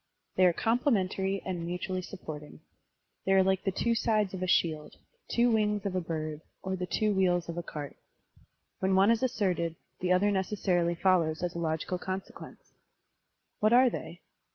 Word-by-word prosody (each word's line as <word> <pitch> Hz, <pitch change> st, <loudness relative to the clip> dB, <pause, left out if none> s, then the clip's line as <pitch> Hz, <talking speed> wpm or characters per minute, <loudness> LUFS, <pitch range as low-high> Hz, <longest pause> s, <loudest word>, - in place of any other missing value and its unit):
They 185 Hz, -1 st, +5 dB
are -, -, +5 dB
complementary 195 Hz, -, 0 dB
and 180 Hz, -3 st, -3 dB
mutually 180 Hz, +2 st, -3 dB
supporting. 155 Hz, -5 st, -9 dB, 0.6 s
They 195 Hz, -, +2 dB
are 190 Hz, 0 st, +6 dB
like 190 Hz, 0 st, +1 dB
the 195 Hz, -, +2 dB
two 230 Hz, +5 st, 0 dB
sides 215 Hz, -4 st, +1 dB
of 185 Hz, -, -5 dB
a 185 Hz, -, -1 dB
shield, 155 Hz, -4 st, +1 dB, 0.2 s
the -, -, -10 dB
two 240 Hz, 0 st, +4 dB
wings 210 Hz, -2 st, +1 dB
of 195 Hz, -, -1 dB
a 185 Hz, -, +1 dB
bird, 155 Hz, -2 st, -4 dB, 0.2 s
or 190 Hz, 0 st, -2 dB
the 180 Hz, -1 st, -4 dB
two 215 Hz, +2 st, +1 dB
wheels 180 Hz, -3 st, +2 dB
of 170 Hz, -, -5 dB
a 175 Hz, -, -2 dB
cart. 150 Hz, -4 st, -7 dB, 0.8 s
When 190 Hz, 0 st, +2 dB
one 195 Hz, +3 st, +5 dB
is 230 Hz, -, +2 dB
asserted, 185 Hz, -10 st, 0 dB, 0.2 s
the 180 Hz, 0 st, 0 dB
other 195 Hz, +3 st, +4 dB
necessarily 185 Hz, -3 st, 0 dB
follows 170 Hz, -3 st, +2 dB
as 175 Hz, -1 st, -1 dB
a 170 Hz, -, -4 dB
logical 165 Hz, +2 st, -2 dB
consequence. 190 Hz, +1 st, -7 dB, 0.9 s
What 215 Hz, +2 st, +3 dB
are 250 Hz, 0 st, +6 dB
they? 175 Hz, -4 st, -7 dB
185 Hz, 175 wpm, -30 LUFS, 170-205 Hz, 0.9 s, are